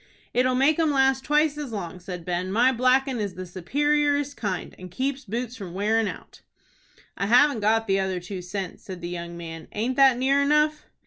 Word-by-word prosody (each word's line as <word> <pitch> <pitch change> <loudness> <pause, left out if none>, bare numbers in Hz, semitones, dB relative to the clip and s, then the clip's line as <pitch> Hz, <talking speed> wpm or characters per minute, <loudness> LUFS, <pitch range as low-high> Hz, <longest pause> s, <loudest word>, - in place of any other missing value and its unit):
"It'll 255 +1 +2
make 285 +5 +3
'em 320 -2 +3
last 270 -1 +2
twice 300 0 +2
as 285 -5 -5
long," 180 -4 -5
said 180 -1 -7
Ben. 180 +1 -2
"My 240 +5 +4
blackin' 255 +1 +2
is 200 -3 -3
the 185 +1 -6
superiorest 285 - 0
kind, 200 -5 -4
and 185 0 -9
keeps 265 +7 -3
boots 235 +3 -4
from 185 -6 -8
wearin' 215 +2 +1
out." - - -9 0.7
"I 195 - -2
havn't 250 +1 +4
got 225 +2 +2
the 195 -2 +1
other 190 -1 -1
two 180 +1 -7
cents," 180 0 -6
said 185 -2 -8
the 175 - -5
young 170 -1 -6
man. 165 -1 -8
"Aint 240 +5 -2
that 270 -3 +6
near 270 +2 +2
enough?" 300 +1 +2
225 Hz, 195 wpm, -25 LUFS, 185-275 Hz, 0.7 s, that